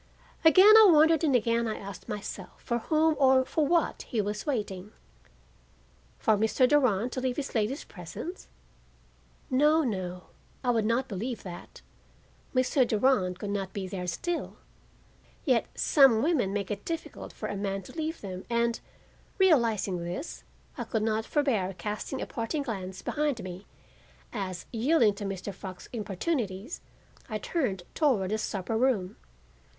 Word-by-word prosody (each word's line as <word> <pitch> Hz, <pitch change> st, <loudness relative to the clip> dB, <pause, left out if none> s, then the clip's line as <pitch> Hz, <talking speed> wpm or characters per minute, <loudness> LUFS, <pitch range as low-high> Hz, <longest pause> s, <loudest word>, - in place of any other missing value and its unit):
Again 370 Hz, +6 st, +8 dB
I 430 Hz, -3 st, +8 dB
wondered 320 Hz, 0 st, +5 dB
and 285 Hz, -5 st, +3 dB
again 235 Hz, 0 st, +2 dB
I 215 Hz, -, -3 dB
asked 195 Hz, -2 st, -9 dB
myself 210 Hz, -, -7 dB
for 235 Hz, 0 st, -1 dB
whom 315 Hz, +5 st, +2 dB
or 260 Hz, -1 st, +5 dB
for 305 Hz, +1 st, 0 dB
what 340 Hz, 0 st, +1 dB
he 230 Hz, -, -3 dB
was 210 Hz, +5 st, -2 dB
waiting. 210 Hz, -6 st, -3 dB, 1.2 s
For 220 Hz, -, +3 dB
Mr. 220 Hz, +5 st, +3 dB
Durand 250 Hz, -5 st, +2 dB
to 255 Hz, -, -3 dB
leave 255 Hz, -1 st, -1 dB
this 285 Hz, -2 st, -4 dB
lady's 225 Hz, +6 st, -1 dB
presence? 165 Hz, -, -8 dB, 1.0 s
No, 300 Hz, +5 st, +4 dB
no, 185 Hz, -7 st, -3 dB, 0.4 s
I 250 Hz, -, +3 dB
would 225 Hz, -3 st, +1 dB
not 235 Hz, +4 st, +1 dB
believe 225 Hz, +3 st, -4 dB
that. 175 Hz, -2 st, -10 dB, 0.7 s
Mr. 255 Hz, 0 st, +3 dB
Durand 210 Hz, -6 st, +2 dB
could 200 Hz, +2 st, -4 dB
not 195 Hz, -2 st, -3 dB
be 195 Hz, -2 st, -4 dB
there 185 Hz, -2 st, -5 dB
still; 340 Hz, -, -3 dB, 0.9 s
yet 255 Hz, -6 st, +2 dB
some 265 Hz, -6 st, +5 dB
women 280 Hz, -, +1 dB
make 200 Hz, 0 st, -3 dB
it 200 Hz, -1 st, -4 dB
difficult 330 Hz, -1 st, -5 dB
for -, -, -6 dB
a -, -, -4 dB
man 195 Hz, -1 st, -3 dB
to -, -, -12 dB
leave 320 Hz, 0 st, -4 dB
them 185 Hz, -2 st, -6 dB
and, 235 Hz, 0 st, +1 dB, 0.6 s
realizing 235 Hz, -, +3 dB
this, 180 Hz, -, -6 dB, 0.4 s
I -, -, -1 dB
could 220 Hz, -3 st, -2 dB
not 220 Hz, 0 st, 0 dB
forbear 225 Hz, -, 0 dB
casting 215 Hz, +5 st, -4 dB
a -, -, -3 dB
parting 260 Hz, +6 st, -3 dB
glance 190 Hz, -6 st, -5 dB
behind 295 Hz, -5 st, -1 dB
me 185 Hz, +2 st, -8 dB, 0.7 s
as, 190 Hz, -5 st, -4 dB
yielding 235 Hz, -1 st, +3 dB
to 200 Hz, +1 st, -6 dB
Mr. 195 Hz, 0 st, -4 dB
Fox's 190 Hz, -1 st, -9 dB
importunities, 215 Hz, -, -3 dB, 0.5 s
I 215 Hz, -, -2 dB
turned 215 Hz, -, -2 dB
toward 230 Hz, -, +1 dB
the 215 Hz, -, 0 dB
supper 205 Hz, +1 st, -3 dB
room. 220 Hz, -6 st, +1 dB
225 Hz, 150 wpm, -28 LUFS, 195-275 Hz, 1.2 s, Again